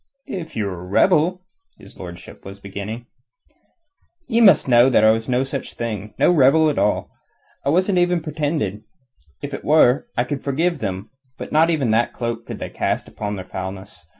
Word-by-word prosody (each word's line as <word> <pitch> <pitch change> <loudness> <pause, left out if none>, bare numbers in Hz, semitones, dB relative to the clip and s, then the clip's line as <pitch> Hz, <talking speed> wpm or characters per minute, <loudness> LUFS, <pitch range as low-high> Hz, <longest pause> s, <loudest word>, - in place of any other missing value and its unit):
"If 170 -4 -7
you 110 - -1
were 95 -3 -5
a - - -9
rebel...?" 175 - +2 0.3
his - - -16
lordship 85 -2 -10
was 95 +1 -10
beginning. 100 +4 -7 1.2
"Ye 235 -2 +2
must 200 -9 +6
know 120 0 +6
that 120 - +3
I 110 - +7
was 110 +1 -2
no 125 +1 +2
such 135 0 -5
thing 105 -3 -5
no - - +4
rebel 155 0 +4
at - - -2
all. - - 0 0.5
It 140 - 0
wasn't 185 +4 +2
even 175 0 +2
pretended. 145 - -2 0.6
If 145 0 -5
it - - -6
were, 150 - +4
I - - +3
could 145 -2 -5
forgive 160 +4 0
them. 95 -1 -5 0.3
But - - -8
not 160 +2 +4
even 145 -9 +1
that 115 +2 +1
cloak 120 -1 -4
could - - -6
they - - -6
cast - - -2
upon 105 -1 -5
their 95 -2 -7
foulness. 95 +2 -8
125 Hz, 185 wpm, -21 LUFS, 105-160 Hz, 1.2 s, I